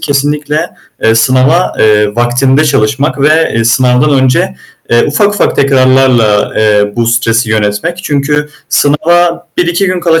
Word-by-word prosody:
kesinlikle, 145 Hz, +1 st, -2 dB, 0.3 s
eee, 115 Hz, 0 st, +2 dB
sınava, 130 Hz, +9 st, +1 dB
eee, 105 Hz, -1 st, +2 dB
vaktinde 130 Hz, +5 st, +1 dB
çalışmak. 135 Hz, +3 st, -1 dB
Ve, 155 Hz, +3 st, +2 dB
eee, 115 Hz, 0 st, 0 dB
sınavdan 125 Hz, +4 st, +1 dB
önce, 130 Hz, -, +1 dB, 0.4 s
eee, 120 Hz, 0 st, +3 dB
ufak 200 Hz, +8 st, 0 dB
ufak -, -, -1 dB
tekrarlarla, 130 Hz, -6 st, +2 dB
eee, 105 Hz, -1 st, +1 dB
bu 120 Hz, -1 st, -1 dB
stresi 115 Hz, -1 st, 0 dB
yönetmek. 105 Hz, +10 st, -2 dB
Çünkü 150 Hz, +1 st, -1 dB, 0.2 s
sınava 170 Hz, +4 st, +1 dB
1-2 175 Hz, +2 st, 0 dB
gün 185 Hz, -1 st, -2 dB
kala 165 Hz, -1 st, +1 dB
135 Hz, 135 wpm, -9 LUFS, 115-150 Hz, 0.4 s, eee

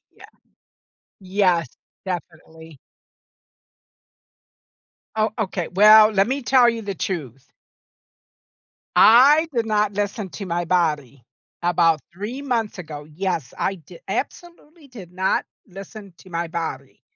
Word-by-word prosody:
Yeah. -, -, -16 dB, 0.9 s
Yes. 185 Hz, -5 st, +1 dB, 0.4 s
Definitely. 160 Hz, -3 st, -8 dB, 2.4 s
Oh, 215 Hz, 0 st, +1 dB
okay. 185 Hz, -5 st, -3 dB
Well, 215 Hz, +3 st, +7 dB
let 195 Hz, -1 st, +2 dB
me 270 Hz, +4 st, -2 dB
tell 245 Hz, +1 st, +4 dB
you 230 Hz, -1 st, -5 dB
the 200 Hz, -2 st, -5 dB
truth. 135 Hz, -, -6 dB, 1.4 s
I 285 Hz, +8 st, +6 dB
did 235 Hz, -2 st, +1 dB
not 210 Hz, -1 st, +1 dB
listen 205 Hz, 0 st, -3 dB
to 200 Hz, -, -7 dB
my 175 Hz, 0 st, -2 dB
body. 150 Hz, -8 st, -1 dB, 0.4 s
About 170 Hz, -2 st, +2 dB
3 215 Hz, +10 st, -6 dB
months 230 Hz, -7 st, -2 dB
ago 155 Hz, -4 st, -8 dB
Yes, 155 Hz, -3 st, -4 dB
I 195 Hz, -, -2 dB
di 170 Hz, -, -15 dB
absolutely 335 Hz, -3 st, -6 dB
did 195 Hz, -9 st, -12 dB
not 190 Hz, +1 st, 0 dB, 0.2 s
listen 195 Hz, +1 st, -11 dB
to 185 Hz, -, -17 dB
my 170 Hz, 0 st, -3 dB
body. 160 Hz, -6 st, -6 dB
190 Hz, 115 wpm, -22 LUFS, 165-220 Hz, 2.4 s, Well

